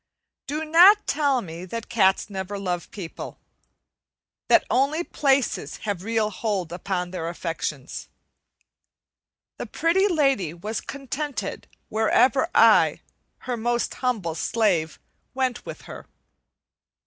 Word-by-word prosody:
Do 305 +3 -3
not 360 +7 +7
tell 280 -3 +1
me 170 0 -8
that 230 +5 -6
cats 190 -5 +2
never 195 -1 -5
love 180 -3 -3
people; 180 -6 -8 1.1
that - - +5
only 285 +6 +1
places 275 -6 0
have 200 -4 -2
real 220 +1 0
hold 195 -5 -2
upon 180 -1 -3
their 165 -3 -4
affections. 165 -5 -5 1.5
The - - -4
Pretty 365 +5 +2
Lady 275 - +1
was 210 +6 -4
contented 280 +1 -5 0.2
wherever 255 +7 +3
I, - - +5 0.4
her 250 -1 -1
most 240 +1 -1
humble 220 -10 -1
slave, 170 -3 0 0.4
went 260 -2 -1
with - - -8
her. - - -10
225 Hz, 115 wpm, -24 LUFS, 180-275 Hz, 1.5 s, not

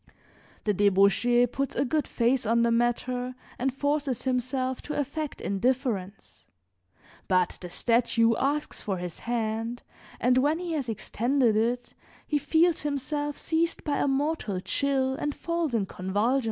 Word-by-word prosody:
The 210 - +1
debauchee 200 +5 +4
puts 275 +3 -3
a - - +1
good 300 +1 0
face 245 +2 +1
on 230 +1 +2
the 235 - +3
matter 245 +2 0 0.2
and 265 +2 +1
forces 285 -1 -1
himself 255 0 -1
to 300 - -4
affect 290 +1 -3
indifference; 200 - -2 0.8
but 185 -2 +1
the 180 - -7
statue 230 +2 +2
asks 290 +2 -1
for 195 -4 -2
his 175 -2 -6
hand, 230 0 -2 0.4
and 250 +1 +3
when 295 +4 +2
he 350 -1 -4
has 285 -7 -2
extended 235 +2 +1
it 240 +3 0 0.3
he 295 - 0
feels 320 +4 +2
himself 290 0 -2
seized 330 +1 0
by 295 -2 0
a - - +1
mortal 275 - 0
chill 265 +7 0
and 295 +1 -3
falls 335 -6 -1
in 210 -4 +1
convulsions. 205 +9 0
250 Hz, 145 wpm, -27 LUFS, 225-285 Hz, 0.8 s, debauchee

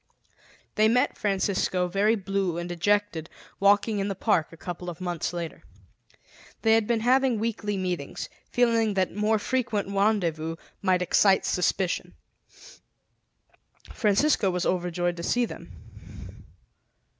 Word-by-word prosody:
They 215 0 +4
met 250 +4 +2
Francisco, 190 -2 0
very 200 +5 +2
blue 195 -4 -2
and 175 0 -4
dejected, 175 -1 0 0.3
walking 205 +2 +3
in 195 - -1
the 195 - -3
park 185 -6 +1
a 165 - -13
couple 175 +1 -6
of 170 0 -8
months 175 -3 -3
later. 170 -2 -6 1.0
They 225 -1 +5
had 225 -2 +3
been 235 -2 +1
having 255 0 +3
weekly 210 -2 -2
meetings, 180 -6 -3 0.2
feeling 230 -3 +2
that 190 -1 0
more 210 +2 +1
frequent 225 -3 -1
rendezvous 180 -6 0 0.3
might 185 -2 +2
excite 190 +2 +3
suspicion. 180 0 -1 1.8
Francisco 210 0 +2
was 180 0 -1
overjoyed 175 -1 -1
to - - -5
see 245 +6 +1
them. - - -10
195 Hz, 125 wpm, -26 LUFS, 180-220 Hz, 1.8 s, They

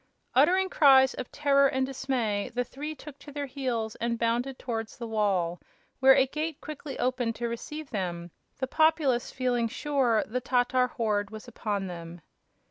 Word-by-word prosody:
Uttering 355 +9 +4
cries 265 -5 +6
of 255 - -7
terror 280 -1 +4
and 265 -1 0
dismay, 255 -5 -1
the 245 - +1
three 295 +5 -6
took 290 -2 -11
to 290 - -11
their 285 0 -3
heels 250 -5 -3
and 235 0 -1
bounded 240 +3 0
towards 225 -3 -4
the 235 - -5
wall, 195 -6 0 0.4
where 265 0 +7
a 265 -1 +5
gate 305 +3 -4
quickly 295 -2 -7
opened 250 -2 0
to 235 - -2
receive 295 +6 -6
them, 175 -4 -3 0.3
the 265 - -1
populace 305 -4 +2
feeling 245 -3 0
sure 255 -2 +1
the 250 +4 -3
Tatar 250 0 +2
horde 210 -4 -1
was 220 +2 -10
upon 210 -4 -3
them. 170 -1 -8
250 Hz, 165 wpm, -28 LUFS, 225-275 Hz, 0.4 s, where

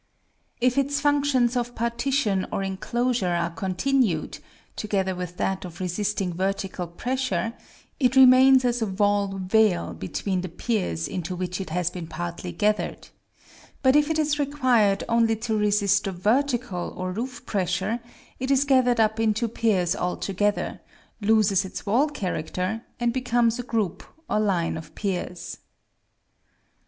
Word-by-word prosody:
If 250 +2 +2
its 280 +1 0
functions 285 -4 +2
of 245 0 -2
partition 235 -3 0
or 195 - -1
enclosure 200 +1 -1
are 170 0 -1
continued, 195 - 0 0.4
together 195 -3 -1
with 180 -1 -6
that 190 -1 -1
of 175 -2 -9
resisting 190 0 -1
vertical 190 0 -2
pressure, 230 +1 -2 0.5
it 255 -2 +2
remains 260 0 +7
as 245 -1 +1
a 220 - +1
wall 205 +1 +1
veil 190 - +2
between 180 - -3
the 185 - -5
piers 165 - -2
into 180 0 -4
which 180 +1 -3
it 190 - -6
has 175 +1 -1
been 175 -3 -7
partly 170 +2 -5
gathered; 210 +5 -1 0.7
but 260 +1 +5
if 295 0 +4
it 320 - 0
is 300 -1 +1
required 255 -8 +2
only 230 -1 +3
to 220 0 -2
resist 205 -1 +2
the 195 - -1
vertical 225 0 0
or 185 0 -3
roof 245 +5 -5
pressure, 190 +3 -1 0.4
it 260 0 -3
is 275 0 +3
gathered 255 -4 +3
up 220 0 +2
into 225 +1 +1
piers 210 -6 +1
altogether, 195 +3 -1 0.4
loses 205 -2 +3
its 190 - -7
wall 245 +9 +2
character, 190 - -3 0.2
and 240 -1 +1
becomes 240 -2 +1
a - - 0
group 215 -7 -2 0.2
or - - +1
line 185 -7 0
of 160 -1 -10
piers. 180 -3 -4
210 Hz, 145 wpm, -25 LUFS, 185-245 Hz, 0.7 s, remains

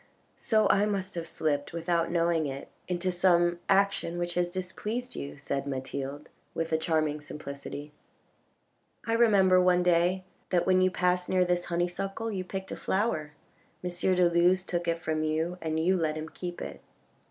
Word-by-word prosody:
"So 215 -4 +2
I 205 +1 +3
must 195 -2 -2
have 170 -1 -4
slipped, 145 -2 -1
without 170 0 0
knowing 170 -2 +1
it, 135 0 -6 0.2
into 180 +1 -1
some 175 -1 +3
action 195 -3 +2
which 175 0 -2
has 175 0 +1
displeased 210 +7 -4
you," 140 - -6
said 140 0 -3
Mathilde 135 +2 -4 0.3
with 165 0 -2
a - - +4
charming 155 -2 0
simplicity. 145 0 -7 0.6
" - - -32
I 225 - 0
remember 200 -6 +5
one 180 0 +4
day 180 +2 +3 0.3
that 175 -2 +2
when 185 0 +4
you 185 - +4
passed 180 0 0
near 185 -1 +3
this 175 0 0
honeysuckle 180 +6 -2
you 190 -3 -2
picked 190 +1 -6
a - - -3
flower, 190 -8 -1 0.5
M. 180 - -1
de 180 0 +3
Luz 175 +2 +3
took 175 -1 -2
it 170 0 +1
from 155 -1 -1
you 160 +3 -1
and 160 -1 -1
you 180 +4 +3
let 160 -3 0
him 155 0 -5
keep 175 +1 -6
it. - - -8
175 Hz, 175 wpm, -29 LUFS, 160-185 Hz, 0.6 s, remember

